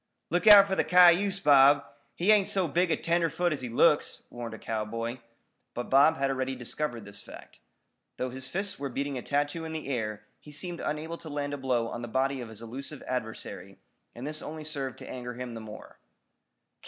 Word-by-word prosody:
"Look 175 Hz, +5 st, +1 dB
out 205 Hz, -2 st, +11 dB
for 195 Hz, -, -3 dB
the -, -, +2 dB
cayuse, 180 Hz, +2 st, +5 dB
Bob. 145 Hz, -2 st, +6 dB, 0.3 s
He 185 Hz, +5 st, +3 dB
ain't 205 Hz, -3 st, +4 dB
so 190 Hz, -3 st, +2 dB
big 175 Hz, +4 st, +1 dB
a 160 Hz, -, +1 dB
tenderfoot 170 Hz, 0 st, 0 dB
as 140 Hz, -, -4 dB
he 125 Hz, -, -5 dB
looks," 145 Hz, +6 st, +2 dB
warned 120 Hz, -2 st, -6 dB
a -, -, -10 dB
cowboy. 115 Hz, +3 st, -4 dB, 0.6 s
But 120 Hz, -, -5 dB
Bob 140 Hz, +4 st, +5 dB
had 135 Hz, 0 st, 0 dB
already 130 Hz, 0 st, -2 dB
discovered 120 Hz, -2 st, -4 dB
this 100 Hz, 0 st, -9 dB
fact. -, -, -13 dB, 0.6 s
Though 130 Hz, 0 st, -3 dB
his 130 Hz, +1 st, -6 dB
fists 195 Hz, +4 st, -2 dB
were 140 Hz, -1 st, -3 dB
beating 140 Hz, +2 st, -3 dB
a -, -, -7 dB
tattoo 145 Hz, +4 st, -1 dB
in 160 Hz, 0 st, -6 dB
the 155 Hz, -3 st, -5 dB
air 110 Hz, -5 st, -3 dB, 0.2 s
he 150 Hz, -, -14 dB
seemed 170 Hz, +3 st, -4 dB
unable 160 Hz, +2 st, -4 dB
to 160 Hz, -, -10 dB
land 145 Hz, -1 st, -3 dB
a -, -, -3 dB
blow 125 Hz, -4 st, 0 dB
on 120 Hz, -, -6 dB
the 120 Hz, -, -5 dB
body 130 Hz, +2 st, 0 dB
of 120 Hz, -, -7 dB
his 110 Hz, +1 st, -11 dB
elusive 135 Hz, +5 st, -7 dB
adversary, 110 Hz, -3 st, -5 dB, 0.4 s
and 120 Hz, +3 st, -7 dB
this 155 Hz, +1 st, -3 dB
only 155 Hz, 0 st, -7 dB
served 140 Hz, -4 st, -4 dB
to -, -, -11 dB
anger 125 Hz, -1 st, -6 dB
him 125 Hz, -1 st, -6 dB
the 115 Hz, -, -7 dB
more. 110 Hz, -1 st, -11 dB
140 Hz, 205 wpm, -28 LUFS, 120-160 Hz, 0.6 s, out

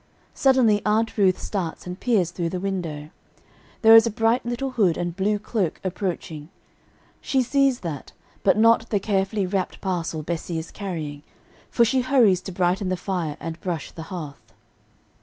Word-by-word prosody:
Suddenly 250 Hz, -6 st, +3 dB
Aunt 220 Hz, +2 st, +1 dB
Ruth 190 Hz, -3 st, +3 dB
starts 180 Hz, -6 st, -4 dB
and 180 Hz, +1 st, -7 dB
peers 200 Hz, -9 st, +1 dB
through 170 Hz, -1 st, -2 dB
the 180 Hz, -, -3 dB
window. 165 Hz, -6 st, -4 dB, 0.7 s
There 225 Hz, 0 st, +9 dB
is 225 Hz, +1 st, +8 dB
a -, -, +1 dB
bright 225 Hz, +2 st, +1 dB
little 245 Hz, +3 st, -3 dB
hood 200 Hz, -9 st, +2 dB
and 175 Hz, -1 st, -3 dB
blue 205 Hz, +2 st, +1 dB
cloak 205 Hz, -5 st, -2 dB
approaching; 175 Hz, -5 st, -4 dB, 0.7 s
she 265 Hz, -2 st, +1 dB
sees 270 Hz, 0 st, +2 dB
that, 155 Hz, -6 st, -6 dB, 0.3 s
but 195 Hz, -, +3 dB
not 230 Hz, +1 st, +4 dB
the 205 Hz, -, +1 dB
carefully 195 Hz, 0 st, 0 dB
wrapped 190 Hz, 0 st, -2 dB
parcel 170 Hz, -4 st, -3 dB
Bessie 170 Hz, +1 st, -3 dB
is 160 Hz, +1 st, -6 dB
carrying, 160 Hz, -8 st, -5 dB, 0.5 s
for 235 Hz, -, +3 dB
she 255 Hz, +2 st, +2 dB
hurries 245 Hz, -8 st, +3 dB
to 190 Hz, -, -7 dB
brighten 185 Hz, +2 st, 0 dB
the 185 Hz, -, -1 dB
fire 170 Hz, -5 st, -3 dB
and 165 Hz, 0 st, -6 dB
brush 175 Hz, -4 st, -4 dB
the 165 Hz, -, -9 dB
hearth. 155 Hz, -7 st, -8 dB
190 Hz, 165 wpm, -24 LUFS, 170-225 Hz, 0.7 s, There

